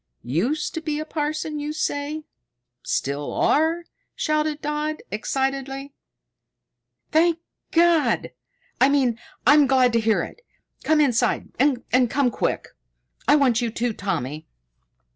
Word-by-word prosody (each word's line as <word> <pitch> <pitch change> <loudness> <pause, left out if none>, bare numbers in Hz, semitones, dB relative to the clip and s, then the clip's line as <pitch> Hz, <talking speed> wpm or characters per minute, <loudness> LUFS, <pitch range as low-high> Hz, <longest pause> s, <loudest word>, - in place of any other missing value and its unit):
"Used 220 - -1
to 325 - -4
be 305 -2 -2
a 310 - -4
parson, 305 0 -3
you 295 +1 -3
say? 300 0 -2 0.6
Still 140 +1 -2
are?" 325 +3 +2 0.3
shouted 305 -1 0
Dodd 300 +1 -3
excitedly. 270 +5 -2 1.2
"Thank 330 +1 +4 0.3
God! 335 -2 +3 0.5
I 260 - +6
mean, 260 -5 +2 0.3
I'm 295 -1 +6
glad 255 -2 +4
to 230 - +4
hear 220 -1 +2
it. - - -9 0.4
Come 310 -1 +3
inside, 250 -6 +1
and 255 -2 +2
come 275 -2 +1
quick. - - -2 0.6
I 290 - +6
want 255 -5 +3
you 235 - 0
too, 235 +1 -2
Tommy!" 155 -8 -3
285 Hz, 125 wpm, -23 LUFS, 245-305 Hz, 1.2 s, I